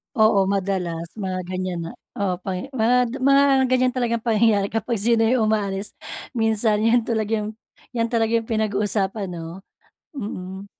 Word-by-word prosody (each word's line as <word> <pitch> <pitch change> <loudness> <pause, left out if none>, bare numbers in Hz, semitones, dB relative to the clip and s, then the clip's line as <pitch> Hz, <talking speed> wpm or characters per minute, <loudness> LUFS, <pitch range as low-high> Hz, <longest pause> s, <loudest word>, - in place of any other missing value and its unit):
Oo, 215 -4 +4
madalas 185 -4 -1
mga 190 -4 -3
ganiyan 185 -1 -3
na - - -7 0.3
Oo, 195 -3 0
pangya 190 +6 -4
mga 245 +1 +2
mga 275 +1 +6 0.3
ganyan 255 0 +3
talagang 235 -2 0
pangyayari 220 -3 +2
kapag 225 0 -2
sino 230 +1 +3
'yung 225 -1 +3
umaalis. 200 -2 -1 0.4
Minsan 220 -1 +2
'yan 230 0 +3
talaga 220 -1 0
'yun 210 +1 -5 0.4
'yan 230 0 0
talaga 225 -1 +2
'yong 230 - +1
pinag-uusapan 205 -2 0
'no. 170 +2 -8 0.5
Mm. 190 -3 -6
215 Hz, 145 wpm, -23 LUFS, 195-230 Hz, 0.5 s, mga